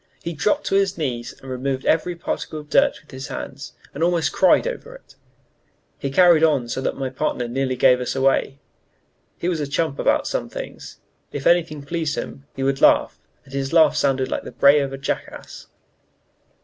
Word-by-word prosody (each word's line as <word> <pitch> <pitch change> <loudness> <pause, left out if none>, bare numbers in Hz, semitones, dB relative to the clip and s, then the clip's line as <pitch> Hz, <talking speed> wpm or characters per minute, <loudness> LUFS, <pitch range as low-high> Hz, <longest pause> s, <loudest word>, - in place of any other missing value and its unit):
He 170 - -4
dropped 210 - 0
on 195 - +4
his 195 -2 0
knees 125 -7 -3
and 135 - -8
removed 130 +1 -3
every 170 +2 +1
particle 165 -2 -4
of 150 0 -13
dirt 280 0 +3
with - - -21
his 130 +1 -7
hands, 140 +2 -7 0.2
and 155 - -2
almost 170 -1 +1
cried - - +4
over - - -5
it. - - -17 0.9
He 140 - -3
carried 170 +2 +5
on 145 -7 +3
so 130 - -3
that - - -2
my 135 -1 -3
partner 125 -1 -2
nearly 130 +1 -1
gave 125 0 +4
us 125 - -3
away. 135 0 +1 0.8
He 170 - -3
was 175 -3 0
a 145 - -2
chump 145 0 -1
about - - +2
some - - -3
things: - - -8 0.3
if 145 -1 -6
anything 165 -4 +2
pleased 160 0 -2
him, 140 0 -7
he 135 - -3
would 135 0 0
laugh, - - +4 0.3
and 135 - -16
his 135 +1 -3
laugh 160 -3 +5
sounded 135 -2 +1
like - - -1
the - - -9
bray 140 +1 +5
of 140 -1 -2
a 135 - -5
jackass. 135 - -6
140 Hz, 195 wpm, -22 LUFS, 135-165 Hz, 0.9 s, carried